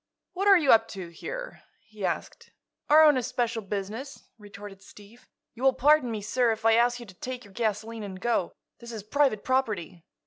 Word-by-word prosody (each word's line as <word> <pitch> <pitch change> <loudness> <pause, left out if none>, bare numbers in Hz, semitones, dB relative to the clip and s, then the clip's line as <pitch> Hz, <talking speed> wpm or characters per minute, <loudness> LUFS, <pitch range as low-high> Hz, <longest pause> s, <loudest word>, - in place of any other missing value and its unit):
"What 390 +3 -1
are 395 -1 +8
you 300 -6 +3
up 225 0 +5
to, 180 -3 -7
here?" - - -8 0.2
he 215 -2 -12
asked. - - -4 0.4
"Our 310 +2 +7
own 300 -3 +6
especial 235 -2 -2
business," 210 +7 -6 0.2
retorted 205 -1 -11
Steve. 210 +5 -17 0.3
"You 240 - -13
will 265 0 +4
pardon 290 -1 +3
me, 215 -3 -4
sir, 240 +2 +1
if 220 0 -5
I 225 - +6
ask 240 +1 +2
you 240 - -9
to 190 - -14
take 250 +6 -7
your 200 - -17
gasoline 220 +1 -3
and 190 -2 -7
go. 210 -4 0 0.3
This 235 -1 -10
is 220 -3 -7
private 260 -2 +1
property." 205 -10 -2
225 Hz, 195 wpm, -27 LUFS, 205-255 Hz, 0.4 s, are